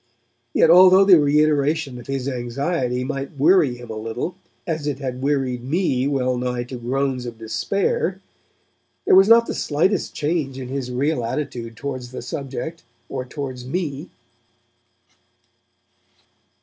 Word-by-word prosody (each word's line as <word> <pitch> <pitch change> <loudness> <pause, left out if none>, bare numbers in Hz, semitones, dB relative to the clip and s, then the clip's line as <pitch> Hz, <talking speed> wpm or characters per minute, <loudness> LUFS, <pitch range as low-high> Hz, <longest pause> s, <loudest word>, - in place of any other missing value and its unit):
Yet, 165 - +4
although 185 +2 +8
the 185 -4 +7
reiteration 150 -2 +2
of 120 - -12
his 135 -1 -3
anxiety 125 +1 -2
might 135 +1 -5
weary 155 -5 +4
him 120 -2 -10
a - - -5
little 115 +10 -4 0.3
as 160 -3 -3
it 145 -3 -1
had 130 -2 -5
wearied 135 -3 -1
me 135 -3 0
well 130 -3 0
nigh 125 0 -2
to 125 +1 -8
groans 130 +1 -2
of 115 -1 -8
despair, 200 - -1 0.9
there - - +4
was 195 +1 +7
not 230 0 +7
the - - -4
slightest 170 +6 0
change 145 -3 -1
in 130 -2 -6
his 135 -2 -4
real 130 +1 0
attitude 115 -2 -4
towards 130 -2 -5
the 130 - -7
subject 140 +4 -5 0.3
or 130 -2 -4
towards 130 -2 -6
me. 150 +2 -4
135 Hz, 140 wpm, -22 LUFS, 125-155 Hz, 0.9 s, although